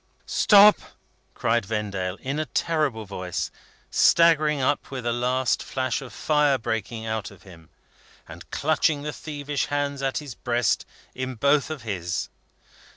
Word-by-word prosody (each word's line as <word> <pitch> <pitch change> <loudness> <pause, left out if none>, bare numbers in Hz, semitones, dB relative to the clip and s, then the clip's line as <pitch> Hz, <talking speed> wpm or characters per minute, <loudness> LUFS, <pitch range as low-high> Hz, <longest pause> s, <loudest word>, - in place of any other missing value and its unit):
"Stop!" 205 0 +6 0.6
cried 120 -1 +1
Vendale, 95 -3 -3
in 140 +3 -3
a 155 - -2
terrible 150 -10 -1
voice, 90 -3 -4 0.4
staggering 155 -3 +4
up 135 +2 0
with 130 -3 -6
a 120 - +1
last 125 0 0
flash 130 0 -2
of 130 - -9
fire 150 -3 +2
breaking 115 -1 -4
out 110 -1 -3
of 100 -2 -17
him, 80 -4 -15 0.6
and - - -12
clutching 155 -1 +1
the 150 0 -4
thievish 145 -2 -4
hands 145 -1 -2
at 135 -1 -1
his 145 -4 -5
breast, 120 -1 0 0.3
in 130 0 -4
both 140 +6 +2
of 155 -6 -6
his. 90 -6 -3
130 Hz, 145 wpm, -25 LUFS, 110-150 Hz, 0.6 s, Stop